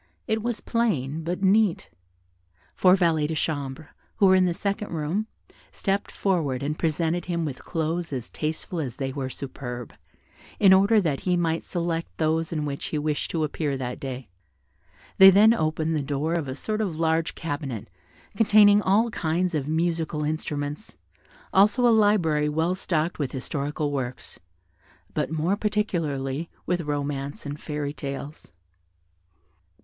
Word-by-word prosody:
It 220 -1 0
was 235 0 -2
plain, 160 - -1
but 180 +4 -3
neat. 200 -1 +3 0.8
Four 185 0 +5
valets 165 -5 +2
de 160 - -3
chambre, 145 -1 -3 0.3
who 205 - +3
were 190 - +6
in 185 -1 +5
the 175 - 0
second 200 +2 -2
room, 170 +7 -2 0.4
stept 195 +1 -2
forward 155 -10 0
and 150 +2 -2
presented 165 +2 0
him 170 -2 -1
with 135 -4 -5
clothes 165 0 -2
as 125 -4 -5
tasteful 160 +3 -3
as 130 -6 -3
they 135 -1 -3
were 135 -2 -3
superb, 125 -3 -7 0.7
in 195 -2 +7
order 200 +3 +5
that 150 -7 0
he 180 -1 0
might 165 -1 0
select 170 -2 -3
those 160 0 0
in 155 -2 -2
which 140 -1 -4
he 155 - -2
wished 150 0 -1
to 160 -2 -1
appear 150 -2 -2
that 125 -1 -4
day. 130 -1 -6 0.9
They 190 0 +11
then 210 +4 +7
opened 160 -4 0
the 150 - 0
door 145 +3 -1
of 165 -5 -1
a 130 - -4
sort 215 +8 -2
of 175 -7 -2
large 160 0 +1
cabinet, 145 -9 -4 0.5
containing 205 -1 +6
all 215 +4 +2
kinds 175 +1 0
of 145 -3 -1
musical 160 -1 -1
instruments, 150 +2 -4 0.6
also 210 +6 +5
a 235 - +5
library 175 -9 +3
well 160 +4 +1
stocked 170 -3 -1
with 140 -4 -2
historical 145 +2 -2
works, 130 -3 -5 0.7
but - - -1
more 160 +5 0
particularly 165 -9 -1 0.2
with 175 -1 0
romances 145 -2 -3
and 145 +1 -5
fairy 150 -1 -3
tales. 140 - -7
160 Hz, 155 wpm, -25 LUFS, 145-185 Hz, 0.9 s, They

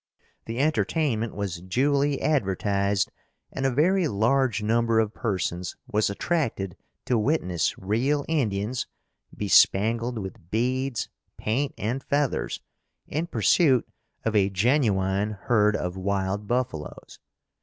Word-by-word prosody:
The 115 +1 -5
entertainment 140 -5 0
was 95 -4 -4
duly 140 +9 +1
advertised 100 -7 +1 0.4
and 135 0 -1
a - - +1
very 170 +7 +3
large 115 +1 +1
number 115 +1 +2
of 110 -1 0
persons 90 -5 -2
was 105 0 +1
attracted 100 - -1 0.3
to 120 -3 +2
witness 105 - 0
real 130 +9 0
Indians, 120 -6 -1 0.5
bespangled 115 +4 +3
with 95 -4 -7
beads, 125 +2 -1 0.3
paint 135 +7 -1
and 120 +6 -2
feathers, 145 -2 -1 0.4
in 160 +4 -3
pursuit 145 -7 +3 0.4
of 110 -1 0
a 100 -1 +4
genuine 100 -2 +1
herd 105 -3 +3
of 90 0 -3
wild 100 +1 -1
buffalos. 120 -11 -3
115 Hz, 110 wpm, -26 LUFS, 100-135 Hz, 0.5 s, a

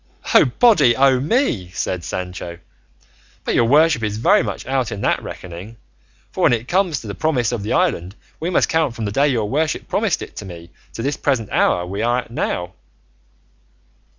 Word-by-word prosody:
"O - - +7
body 140 - +4
o' 130 0 +4
me!" 140 - 0
said 90 -2 -2
Sancho, 90 -1 -5 0.9
"but - - -1
your 120 - +3
worship 150 +1 +4
is 105 -1 -2
very 115 - +4
much 100 -5 -5
out 130 -2 -1
in 100 - -5
that - - +1
reckoning; 95 +6 -9 0.5
for - - -5
when - - +5
it 120 +1 -2
comes 180 -7 +1
to 110 - -10
the 100 - -5
promise 125 -3 0
of 120 -4 -3
the 105 - -2
island 90 +4 0 0.2
we 165 - -2
must 180 - +2
count 160 -7 0
from 115 - -4
the 100 - -2
day 140 +7 +2
your 115 -7 0
worship 150 +7 -1
promised - - 0
it - - -11
to - - -5
me 85 -2 -10 0.2
to 115 - -5
this 140 +2 -1
present 115 -6 -1
hour 90 0 +2
we 100 +4 -4
are 120 +2 +1
at 115 - -17
now." 90 -6 -3
115 Hz, 195 wpm, -20 LUFS, 100-140 Hz, 0.9 s, O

